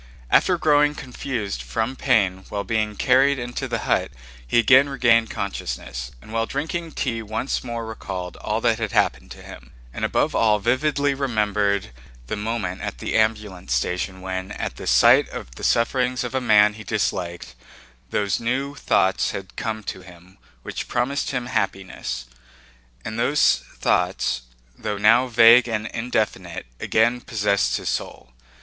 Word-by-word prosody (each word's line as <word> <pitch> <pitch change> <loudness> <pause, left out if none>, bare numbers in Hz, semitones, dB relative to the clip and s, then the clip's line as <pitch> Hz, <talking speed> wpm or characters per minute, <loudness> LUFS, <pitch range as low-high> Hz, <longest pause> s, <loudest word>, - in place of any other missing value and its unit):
After 180 -2 +4
growing 150 -2 +3
confused 125 -6 -4
from 115 +3 -2
pain 100 -9 +1
while 100 -1 -3
being 110 -1 -1
carried 135 +4 +3
into 120 +2 -4
the 120 -2 -2
hut - - +1 0.4
he - - +1
again 130 +5 +6
regained 115 -4 +3
consciousness, 65 -10 -5
and 110 - -12
while 115 0 0
drinking 165 +3 -4
tea 115 -4 -2
once 110 +5 -3
more 115 -2 -4
recalled 95 -5 -6
all - - -2
that - - +2
had - - -3
happened - - +1
to - - -11
him, 65 0 -12 0.2
and - - -6
above - - +1
all 110 -2 +3
vividly 140 +6 +1
remembered 105 - 0 0.3
the 60 - -3
moment 105 -4 -3
at - - -5
the - - -3
ambulance 105 - 0
station 90 +7 -2
when, 95 +1 -4
at - - -4
the - - -7
sight - - +5
of 60 - -8
the - - -11
sufferings 125 +2 +1
of 120 - -5
a 130 - 0
man 105 -3 +5
he 105 0 -10
disliked, 90 -6 -2 0.6
those 100 -2 0
new 130 +4 -1
thoughts 95 -8 +1
had 95 -1 -7
come 110 -1 -3
to 95 - -6
him 90 +1 -16 0.2
which - - -5
promised 135 +4 -1
him 125 -3 -2
happiness. 95 - -3 0.8
And 110 +1 -4
those 145 +5 +3 0.2
thoughts, 60 -1 0 0.3
though 105 +3 -4
now 115 +5 +5
vague 120 +1 +7
and 110 -2 -2
indefinite, 110 -7 -2
again 120 +2 +2
possessed 100 - 0
his - - -4
soul. 65 - -5
110 Hz, 155 wpm, -23 LUFS, 100-125 Hz, 0.8 s, vague